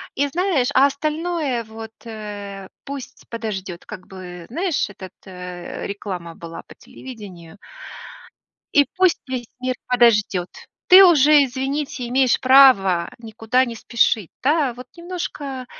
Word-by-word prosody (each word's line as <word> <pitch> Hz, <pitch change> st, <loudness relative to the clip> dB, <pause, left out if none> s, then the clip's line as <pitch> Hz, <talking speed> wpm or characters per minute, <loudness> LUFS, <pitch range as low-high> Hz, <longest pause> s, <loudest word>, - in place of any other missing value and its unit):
И 285 Hz, +1 st, +1 dB
знаешь, 320 Hz, -4 st, 0 dB
а 270 Hz, +2 st, +7 dB
остальное 305 Hz, -3 st, -2 dB
вот, 220 Hz, 0 st, -9 dB
э, 205 Hz, -3 st, -8 dB, 0.2 s
пусть 275 Hz, -2 st, -8 dB
подождет, 195 Hz, -6 st, -5 dB
как 190 Hz, -4 st, -10 dB
бы. 180 Hz, -2 st, -10 dB
Знаешь, 335 Hz, -, -1 dB
этот, 190 Hz, -2 st, -11 dB
э, 180 Hz, -2 st, -7 dB
реклама 180 Hz, -4 st, -6 dB
была 165 Hz, 0 st, -9 dB
по -, -, -14 dB
телевидению- 200 Hz, -8 st, -12 dB, 1.2 s
"И 285 Hz, -1 st, +5 dB
пусть 370 Hz, -2 st, +3 dB
весь 255 Hz, -3 st, -4 dB
мир 255 Hz, 0 st, -1 dB
подождет". 210 Hz, -7 st, +3 dB, 0.4 s
Ты 380 Hz, +2 st, +10 dB
уже, 300 Hz, -3 st, +6 dB
извините, 265 Hz, 0 st, -3 dB
имеешь 255 Hz, -1 st, +3 dB
право 255 Hz, -10 st, +6 dB
никуда 230 Hz, +3 st, 0 dB
не 235 Hz, -, -6 dB
спешить, 225 Hz, -4 st, +1 dB
да. 285 Hz, -3 st, +2 dB
Вот 250 Hz, +1 st, -11 dB
немножко 300 Hz, -7 st, -6 dB
240 Hz, 125 wpm, -21 LUFS, 200-280 Hz, 1.2 s, Ты